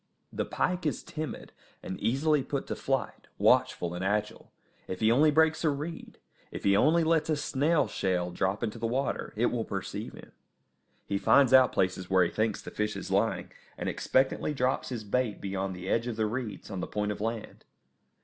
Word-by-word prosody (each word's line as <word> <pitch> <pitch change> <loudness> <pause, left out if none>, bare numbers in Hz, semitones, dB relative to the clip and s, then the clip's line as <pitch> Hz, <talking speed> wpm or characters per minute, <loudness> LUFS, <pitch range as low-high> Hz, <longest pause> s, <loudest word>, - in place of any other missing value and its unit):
The - - -1
pike 180 -3 -1
is 150 - -2
timid, 155 -1 -6 0.3
and 95 - -5
easily 145 +4 +2
put 140 +1 -3
to - - -4
flight, 135 0 -2
watchful 85 0 +3
and 90 +1 -4
agile; 105 +2 -2 0.4
if 95 - -5
he 110 0 +4
only 145 +6 +5
breaks 160 +2 +3
a 160 - +4
reed, 150 +4 -5 0.3
if - - -7
he 100 0 +4
only 160 +10 +4
lets 160 -1 +2
a 155 - +3
snail 145 +2 +1
shell 90 -2 -1
drop 95 +4 -1
into 115 0 -3
the 115 - -1
water, 130 +4 -2
it - - +2
will - - -1
perceive - - -5
him. - - -13 0.7
He 100 - -1
finds 130 +6 +5
out 130 -1 +7
places 90 -1 -1
where 95 -1 +5
he 85 - -1
thinks 110 -1 -1
the - - -8
fish 105 0 -2
is - - -6
lying, - - 0 0.3
and - - -4
expectantly 135 +3 +1
drops 130 0 0
his 120 -4 -4
bait 110 +1 -1
beyond 95 -1 -3
the 90 +1 -8
edge 115 +4 +1
of 120 - -3
the 110 0 0
reeds 110 -2 -4
on 95 - -4
the - - -3
point 105 0 -2
of 105 - -6
land. 115 0 -4
115 Hz, 195 wpm, -29 LUFS, 100-145 Hz, 0.7 s, out